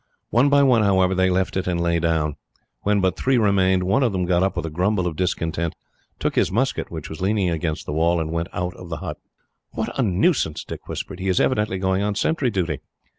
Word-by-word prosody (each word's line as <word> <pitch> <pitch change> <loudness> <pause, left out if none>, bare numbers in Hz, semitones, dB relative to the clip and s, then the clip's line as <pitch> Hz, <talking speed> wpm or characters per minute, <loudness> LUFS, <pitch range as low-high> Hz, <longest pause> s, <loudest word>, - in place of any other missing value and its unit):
One 125 +5 +4
by 140 0 +5
one, 125 -4 +4
however, 95 -2 +3
they 95 0 +2
left 95 +1 0
it 95 -1 -1
and 85 -1 0
lay 85 0 +1
down. 80 -3 0 0.5
When 100 0 +2
but 95 -1 +1
three 130 +4 +1
remained, 95 -4 +3
one 100 +9 +2
of 120 -6 +2
them 90 -1 0
got 90 0 +2
up, 95 -1 0
with 85 - -2
a 80 - -4
grumble 90 +3 +1
of 85 -3 -2
discontent, 85 -2 -1 0.4
took - - -1
his - - +2
musket, 130 +7 0
which 80 -3 -6
was 80 +1 -8
leaning 95 -2 +1
against 80 -1 -2
the - - -4
wall, 85 +2 +2
and 80 -1 -3
went 85 +1 -2
out 90 -1 -3
of 90 - -10
the 80 - -3
hut. 75 -3 -6 0.6
"What - - -3
a - - +5
nuisance!" 100 - +1
Dick - - -9
whispered. 95 -2 -6
"He 95 - -3
is 90 - +2
evidently 105 -6 +1
going 95 +1 0
on 105 0 -1
sentry 135 +3 +1
duty." 85 - -1
95 Hz, 230 wpm, -22 LUFS, 85-100 Hz, 0.6 s, by